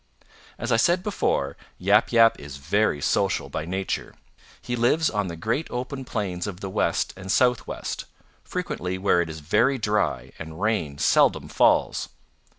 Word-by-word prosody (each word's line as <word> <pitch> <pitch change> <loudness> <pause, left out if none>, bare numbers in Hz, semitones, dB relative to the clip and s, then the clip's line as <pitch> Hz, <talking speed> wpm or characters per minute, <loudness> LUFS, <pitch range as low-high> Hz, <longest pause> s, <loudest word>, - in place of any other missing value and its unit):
"As 120 +2 -3
I 115 - +4
said 175 +10 +3
before, 70 - -1 0.2
Yap 100 +4 +3
Yap 115 -1 +5
is 70 -1 -9
very 80 +2 +1
social - - 0
by 75 - -4
nature. 95 +2 -3 0.4
He 120 - -4
lives 135 +7 +2
on 105 -2 -1
the 85 - -5
great 115 - -2
open 130 +2 -5
plains 95 -7 -3
of 95 -3 -6
the 95 -1 -5
West - - 0
and 95 0 -5
Southwest, 125 0 0 0.4
frequently 90 +2 -3
where 95 -2 +3
it 85 - -3
is 80 -1 -7
very 105 - +2
dry 105 - -1
and 80 +1 -8
rain 100 -9 -1
seldom - - +3
falls. - - +2
100 Hz, 155 wpm, -25 LUFS, 85-120 Hz, 0.4 s, Yap